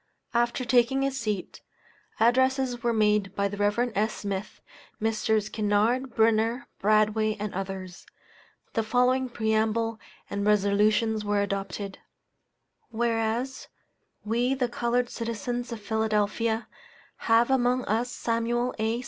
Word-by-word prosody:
After 240 Hz, +2 st, +1 dB
taking 250 Hz, +2 st, +3 dB
his 270 Hz, -1 st, -1 dB
seat, 210 Hz, -5 st, -4 dB, 0.6 s
addresses 260 Hz, +1 st, +2 dB
were 235 Hz, -, +1 dB
made 210 Hz, -3 st, +2 dB
by 200 Hz, 0 st, +1 dB
the 200 Hz, -, -5 dB
Rev. 205 Hz, +4 st, +1 dB
S. 215 Hz, +2 st, 0 dB
Smith, 200 Hz, 0 st, -5 dB, 0.4 s
Messrs. 220 Hz, -1 st, +1 dB
Kinnard, 220 Hz, +5 st, 0 dB
Brunner, 225 Hz, +2 st, +2 dB, 0.2 s
Bradway, 215 Hz, +1 st, +2 dB
and 210 Hz, 0 st, -4 dB
others. 190 Hz, -2 st, -6 dB, 0.7 s
The 225 Hz, -, +1 dB
following 250 Hz, +3 st, +2 dB
preamble 220 Hz, 0 st, 0 dB, 0.3 s
and 200 Hz, 0 st, -3 dB
resolutions 210 Hz, +2 st, +2 dB
were 205 Hz, 0 st, +1 dB
adopted 200 Hz, 0 st, -4 dB, 0.9 s
WHEREAS, 230 Hz, +2 st, -1 dB, 0.6 s
We, 240 Hz, +5 st, +1 dB
the 250 Hz, -2 st, 0 dB
colored 240 Hz, +1 st, 0 dB
citizens 235 Hz, +2 st, -4 dB
of 230 Hz, -, -5 dB
Philadelphia, 220 Hz, +1 st, 0 dB, 0.6 s
have 230 Hz, +2 st, +4 dB
among 250 Hz, -1 st, +2 dB
us 230 Hz, +4 st, 0 dB
Samuel 240 Hz, +2 st, -1 dB
A. 220 Hz, +2 st, 0 dB
225 Hz, 115 wpm, -27 LUFS, 210-240 Hz, 0.9 s, have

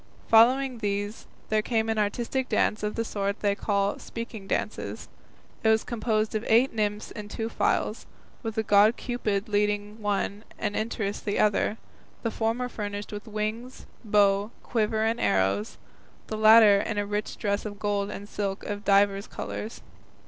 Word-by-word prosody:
Following 250 Hz, +3 st, +5 dB
these 205 Hz, 0 st, -3 dB, 0.2 s
there 215 Hz, 0 st, +2 dB
came 225 Hz, 0 st, 0 dB
an 220 Hz, -1 st, 0 dB
artistic 240 Hz, +5 st, -1 dB
dance 215 Hz, -, +1 dB
of 210 Hz, 0 st, -2 dB
the 230 Hz, -, -1 dB
sort 200 Hz, -1 st, -2 dB
they 205 Hz, -1 st, +2 dB
call 200 Hz, -1 st, 0 dB
"speaking 230 Hz, -4 st, -7 dB
dances." -, -, -3 dB, 0.6 s
It 220 Hz, -, +4 dB
was 220 Hz, 0 st, +4 dB
composed 220 Hz, -2 st, -1 dB
of 215 Hz, 0 st, -1 dB
eight 235 Hz, +4 st, +4 dB
nymphs 210 Hz, -1 st, -2 dB
in 210 Hz, -2 st, -7 dB
two 225 Hz, +1 st, -3 dB
files, -, -, 0 dB, 0.3 s
with 225 Hz, -3 st, -4 dB
the 220 Hz, -, 0 dB
god 210 Hz, +2 st, +5 dB
Cupid 220 Hz, -4 st, -2 dB
leading 210 Hz, +1 st, -1 dB
one 205 Hz, 0 st, -1 dB
and 205 Hz, -1 st, -2 dB
Interest 215 Hz, -2 st, -2 dB
the 205 Hz, -, -1 dB
other, 210 Hz, +1 st, +2 dB, 0.5 s
the 230 Hz, -, 0 dB
former 230 Hz, +3 st, -1 dB
furnished 205 Hz, -3 st, -5 dB
with 205 Hz, 0 st, -7 dB
wings, 215 Hz, +4 st, -4 dB, 0.2 s
bow, 205 Hz, -1 st, +3 dB
quiver 220 Hz, -2 st, 0 dB
and 225 Hz, +1 st, 0 dB
arrows, 95 Hz, +2 st, +1 dB, 0.5 s
the 220 Hz, -, -5 dB
latter 215 Hz, -1 st, +7 dB
in 220 Hz, 0 st, -3 dB
a 205 Hz, -, 0 dB
rich 205 Hz, +1 st, -3 dB
dress 200 Hz, -1 st, -1 dB
of 205 Hz, -1 st, -6 dB
gold 205 Hz, -1 st, -1 dB
and 205 Hz, 0 st, -7 dB
silk 200 Hz, -1 st, -3 dB
of 205 Hz, 0 st, -5 dB
divers 200 Hz, 0 st, +3 dB
colours. 220 Hz, -, -6 dB
210 Hz, 165 wpm, -27 LUFS, 205-225 Hz, 0.6 s, latter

